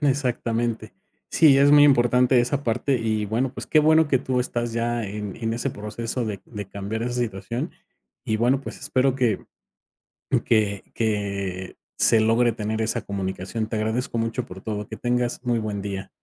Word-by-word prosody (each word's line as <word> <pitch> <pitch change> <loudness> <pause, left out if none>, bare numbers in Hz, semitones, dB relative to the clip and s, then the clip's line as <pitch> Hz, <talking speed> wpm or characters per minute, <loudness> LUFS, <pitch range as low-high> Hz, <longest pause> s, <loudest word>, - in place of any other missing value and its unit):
Exactamente. 120 -5 -1 0.4
Sí, 145 -4 +6
es 140 +1 +6
muy 145 0 +8
importante 125 -2 +4
esa 140 +4 -1
parte 125 +4 +1
y 110 -2 -1
bueno, 120 +5 -1
pues, - - -7
qué 155 - +4
bueno 155 0 +4
que 135 - +3
tú 130 -1 -1
estás 120 -1 -2
ya 115 0 -1
en 105 -1 -5
en 115 -1 -2
ese 120 +4 -2
proceso 115 +3 -4
de 105 -3 -4
de 105 -4 -7
cambiar 100 +3 -4
esa 120 +1 -2
situación 120 0 -3 0.5
y 110 - 0
bueno, 125 +4 +2
pues, - - -8
espero 130 0 +1
que 120 -6 0 1.0
que 105 -3 +1
que 100 -4 -2 0.2
se 115 - +5
logre 115 +2 +3
tener 110 0 -2
esa 110 - 0
comunicación. 95 +2 -4
Te 110 - -4
agradezco 110 +3 -1
mucho 115 +2 -1
por 95 -2 -10
todo. 105 -2 -4
Que 110 - -7
tengas 120 0 -1
muy 120 -2 +1
buen 105 -2 -3
día. 95 -1 -5
115 Hz, 175 wpm, -24 LUFS, 105-125 Hz, 1.0 s, muy